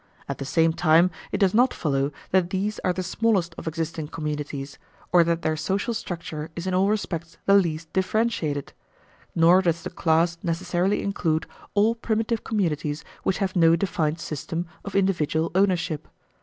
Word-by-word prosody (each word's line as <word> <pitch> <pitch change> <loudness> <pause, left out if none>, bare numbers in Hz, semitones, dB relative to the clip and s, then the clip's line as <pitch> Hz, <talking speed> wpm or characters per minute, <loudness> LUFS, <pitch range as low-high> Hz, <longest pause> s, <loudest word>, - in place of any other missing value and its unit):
At - - -4
the 135 - -4
same 165 +3 +3
time 165 +2 +4 0.2
it - - 0
does 195 -2 +3
not 245 +4 +4
follow 140 -3 0 0.2
that 185 -2 +3
these 200 +3 -2
are 185 - +1
the 185 +1 -3
smallest 190 -2 +1
of - - -8
existing 160 -1 -3
communities, 150 -3 -5 0.3
or 175 -1 +6
that 170 0 0
their 155 0 +1
social 190 +9 -1
structure 165 -6 -5
is 170 - -5
in 185 - -1
all 190 +2 +3
respects 170 -6 -3
the 195 - +5
least 165 -5 +2
differentiated; 190 -8 0 0.6
nor 170 +3 +6
does 170 -2 0
the - - -5
class 170 +1 +2
necessarily 180 +2 0
include 165 -5 0 0.3
all 210 +3 +4
primitive 225 0 -1
communities 155 -7 -1 0.2
which 190 - 0
have 195 -2 -1
no 165 -2 +6
defined 165 -3 -1
system 165 +2 -4 0.2
of 200 - -7
individual 165 -5 +1
ownership. 180 -5 +1
170 Hz, 165 wpm, -25 LUFS, 160-190 Hz, 0.6 s, or